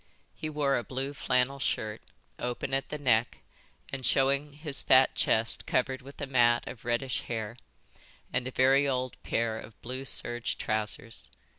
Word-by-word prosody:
He 155 - -5
wore 145 -2 +1
a - - -5
blue 135 +3 -4
flannel 125 0 +1
shirt, 110 -5 -2 0.4
open 125 +2 -3
at 135 0 0
the 150 - -3
neck 120 -5 +2 0.6
and 135 -1 -4
showing 140 +3 +2
his 150 -1 -1
fat 130 0 +5
chest 110 +1 +1
covered 130 +1 0
with 140 +2 -12
a 145 - -2
mat 120 -3 +3
of 115 - -8
reddish 120 +2 0
hair, 110 -1 -3 0.8
and 125 0 0
a - - -4
very 135 +2 +4
old 130 -1 -2
pair 115 -1 -1
of 110 - -12
blue 130 +3 -5
serge 120 -2 +1
trousers. 110 - -2
130 Hz, 160 wpm, -29 LUFS, 120-135 Hz, 0.8 s, fat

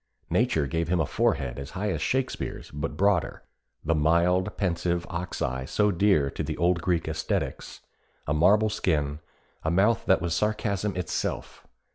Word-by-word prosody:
Nature 75 -3 +2
gave 80 +4 -1
him 90 +1 +1
a 80 - +2
forehead 75 - 0
as 70 - -7
high 105 +1 -1
as - - -3
Shakespeare's, 130 0 -2
but 75 +1 -4
broader; 100 -2 +1 0.4
the 80 - +2
mild, 85 +5 +2
pensive 85 -2 0
ox 85 0 -3
eye 65 0 -2
so 105 +8 +2
dear 85 -7 +2
to - - -5
the 80 0 -3
old 85 0 +2
Greek 85 -1 +1
æsthetes; 80 0 -3 0.4
a 75 - 0
marble 105 +7 +4
skin, 75 -7 0 0.4
a 80 - -1
mouth 100 +7 +2
that 95 - +5
was 85 -1 -2
sarcasm 105 +1 -1
itself. 90 -2 -4
85 Hz, 160 wpm, -27 LUFS, 80-100 Hz, 0.4 s, that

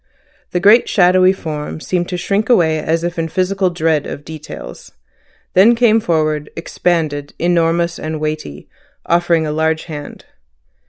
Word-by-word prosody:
The 180 - -1
great 210 +6 +5
shadowy 185 0 +4
form 155 -5 -5
seemed 175 +1 -2
to 180 - -3
shrink 200 +5 -1
away 160 -9 +3
as 165 +2 -1
if 175 0 -3
in 165 - -1
physical 185 +2 0
dread 160 -3 0
of 145 - -8
details; 155 - -10 0.6
then 210 +6 +6
came 230 -2 +4
forward, 155 -5 -1
expanded, 160 -4 -2
enormous, 170 0 +1
and 155 0 -4
weighty, 155 - -5 0.4
offering 170 -1 +2
a 150 - -2
large 160 +1 0
hand. 150 -3 -9
165 Hz, 145 wpm, -17 LUFS, 155-180 Hz, 0.6 s, then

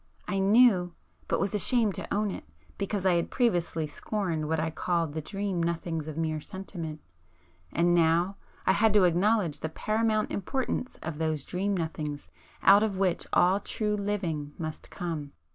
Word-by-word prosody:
I 195 - 0
knew,—but 195 -4 +2
was 195 - 0
ashamed 215 +1 +2
to - - -6
own 210 0 +1
it, - - -6 0.4
because 200 -1 -2
I 185 - +5
had 170 - -1
previously 175 -9 +1
scorned 165 -1 -3
what 160 0 0
I 160 +1 -1
called 165 -2 -1
the 160 - -3
dream 195 +1 -2
nothings 165 -2 -2
of 155 -1 -6
mere 155 -1 -1
sentiment. 165 -4 -7 0.7
And 175 +1 +3
now 170 +3 +3 0.3
I - - +5
had 210 +2 +3
to 205 - +6
acknowledge 180 -1 +2
the 160 - -3
paramount 215 +4 0
importance 255 +4 -2
of 160 -1 -5
those 155 -3 -1
'dream 195 +2 -1
nothings' 155 -3 -4 0.3
out 200 +1 +8
of 210 -3 0
which 185 -3 0
all 185 +3 +4
true 210 +1 -1
living 185 -8 -2
must 155 -2 -6
come. 160 -5 -5
180 Hz, 160 wpm, -28 LUFS, 160-205 Hz, 0.7 s, out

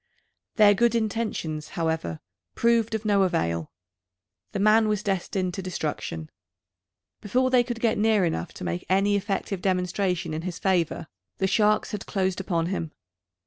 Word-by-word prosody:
Their 210 -2 +7
good 235 +2 +2
intentions, 215 -9 -2
however, 160 - -1 0.3
proved 230 -1 +2
of 220 0 -4
no 205 -2 +3
avail. 85 - 0 0.8
The 210 - -3
man 215 +2 +4
was 210 -1 0
destined 190 -1 -1
to 190 - -4
destruction. 150 - -4 0.9
Before 255 +5 +1
they 250 -1 +5
could 240 -1 -5
get 225 -2 +1
near 215 -3 +3
enough 120 - -2
to - - -8
make 85 0 -3
any 195 +2 +3
effective 195 -1 -2
demonstration 180 -2 0
in 155 - -3
his 180 0 -5
favour, 175 -3 0 0.3
the 190 - 0
sharks 210 +2 +2
had 210 - -5
closed 190 -2 0
upon 170 -3 0
him. 170 -3 -3
195 Hz, 150 wpm, -26 LUFS, 170-215 Hz, 0.9 s, Their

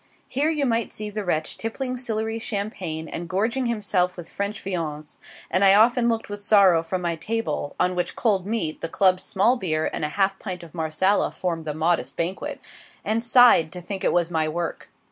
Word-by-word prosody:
Here 285 +4 0
you 300 -3 0
might 230 -3 0
see 210 0 -6
the 210 0 -4
wretch 160 -4 -1
tippling 255 +3 -3
Sillery 225 -2 -2
champagne 195 -7 -4
and 170 +2 -6
gorging 230 +8 0
himself 200 -6 0
with 175 -2 -9
French 200 +1 -3
viands; 155 -5 -4 0.3
and 185 - +3
I 195 0 +7
often 235 +3 +4
looked 225 -1 -1
with 205 0 -5
sorrow 200 -5 +5
from 180 +2 -4
my 170 -1 0
table, 215 -3 -3
(on 180 - +2
which 180 - -2
cold 200 -5 +1
meat, 210 -8 -2
the 165 - -3
Club 185 +1 +3
small 215 +8 +2
beer, 155 -7 -1
and - - -3
a 150 - 0
half 195 +3 0
pint 180 -4 -6
of 165 - -13
Marsala 170 +4 +1
form 170 -4 -3
the 150 -1 -3
modest 165 +2 0
banquet,) 190 - -3 0.5
and 220 +2 0
sighed 240 -9 +6
to 180 - -6
think 190 +2 -6
it - - +3
was 175 -1 +1
my 160 -2 0
work. 170 +1 -4
195 Hz, 200 wpm, -24 LUFS, 170-225 Hz, 0.5 s, I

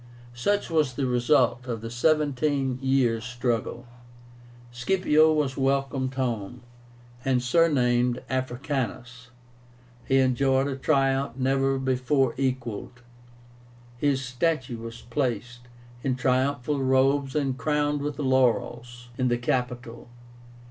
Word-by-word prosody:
Such 200 +12 -1
was 155 -5 +2
the 135 - -1
result 125 0 +2
of 115 -3 -4
the 115 0 -6
seventeen 140 -1 +1
years' 130 -4 +1
struggle. 120 0 -2 0.9
Scipio 155 +4 +3
was 150 -4 0
welcomed 135 -1 0
home, 125 -3 -3 0.6
and 130 -2 +2
surnamed 125 -3 +2
AFRICANUS. 130 -1 -3 0.8
He 135 - +3
enjoyed 130 +1 +2
a 140 -1 -2
triumph 135 -2 +1
never 135 +1 +1
before 130 0 +1
equalled. 125 -2 -3 1.0
His 135 -1 +1
statue 130 -2 -1
was 115 +1 -8
placed, 120 -1 -3 0.4
in 130 -2 0
triumphal 130 +2 0
robes 135 +1 +2
and 140 -3 0
crowned 150 0 0
with 145 -1 -3
laurels, 120 -3 0
in 130 - +2
the 120 -1 +1
Capitol. 125 -1 -3
130 Hz, 105 wpm, -26 LUFS, 120-140 Hz, 1.0 s, Scipio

